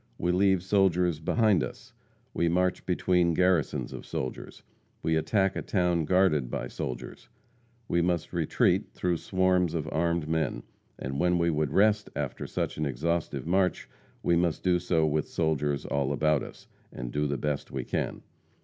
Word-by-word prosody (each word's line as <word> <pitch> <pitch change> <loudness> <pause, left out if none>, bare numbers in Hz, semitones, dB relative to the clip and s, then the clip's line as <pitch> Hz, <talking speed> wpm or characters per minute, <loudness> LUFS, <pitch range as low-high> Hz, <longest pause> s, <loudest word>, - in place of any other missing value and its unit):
We 90 - 0
leave 95 0 +3
soldiers 90 -4 +2
behind 105 +3 +2
us; - - -8 0.4
we 85 - +1
march 90 +2 0
between 90 -2 +2
garrisons 90 -4 +1
of - - -7
soldiers; 65 - -6 0.4
we 80 - +1
attack 95 +4 +1
a - - -2
town 90 -4 +1
guarded 80 -8 +2
by - - -4
soldiers; 65 - -6 0.6
we 85 - +2
must 85 -1 -1
retreat - - +1
through 90 -2 0
swarms 90 -2 +1
of 80 -2 -2
armed 85 -1 0
men; 80 -3 -1 0.3
and 70 +1 -4
when 90 +1 +3
we 85 0 +2
would 75 -1 0
rest 105 +1 +3
after 70 -2 -4
such - - -3
an 75 - -1
exhaustive 80 +5 -2
march, 90 +2 +1 0.4
we 85 - +3
must 85 -3 0
do 90 -1 +3
so 85 -2 +1
with 75 0 0
soldiers 75 -3 0
all 70 -1 -1
about 75 0 +2
us, - - -10 0.2
and - - -6
do 75 +2 0
the 70 0 -1
best 75 +2 -2
we - - -4
can. - - -3
85 Hz, 165 wpm, -28 LUFS, 75-90 Hz, 0.6 s, leave